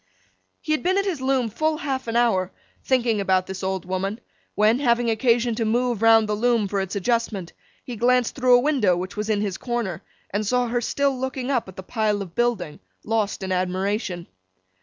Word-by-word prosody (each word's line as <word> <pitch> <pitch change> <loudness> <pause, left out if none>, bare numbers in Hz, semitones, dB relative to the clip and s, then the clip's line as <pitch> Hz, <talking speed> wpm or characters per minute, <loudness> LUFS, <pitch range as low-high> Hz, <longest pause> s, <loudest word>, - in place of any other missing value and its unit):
He - - -4
had 310 - +1
been 370 +2 +1
at 395 - +1
his 350 -9 -2
loom 260 -2 +1
full 310 +7 0
half 270 -5 -3
an 230 - -3
hour, 195 -6 +2 0.3
thinking 235 -5 +1
about 185 -1 +2
this 190 0 -6
old 190 -1 -2
woman, 190 +4 -3 0.4
when, 215 +4 +3
having 240 -3 +2
occasion 235 +1 +2
to 225 +1 -1
move 235 0 0
round 225 -1 +5
the 210 - -1
loom 230 -1 +1
for 195 0 -1
its 190 +1 -4
adjustment, 205 -3 -1 0.3
he 245 - -6
glanced 245 +1 +2
through 255 -2 +4
a - - +6
window 245 - +2
which 185 +1 -5
was 210 +1 -3
in 210 -2 +1
his 200 -4 -3
corner, 235 -8 -3 0.3
and 205 +1 -1
saw 250 +1 +1
her 240 +1 0
still 280 +3 0
looking 260 0 -3
up 245 -6 0
at 190 - -11
the 190 - -8
pile 210 -1 -1
of 175 -3 -12
building, 210 -10 -1 0.2
lost 215 -2 -1
in 190 - -3
admiration. 185 0 -1
225 Hz, 200 wpm, -23 LUFS, 195-250 Hz, 0.4 s, a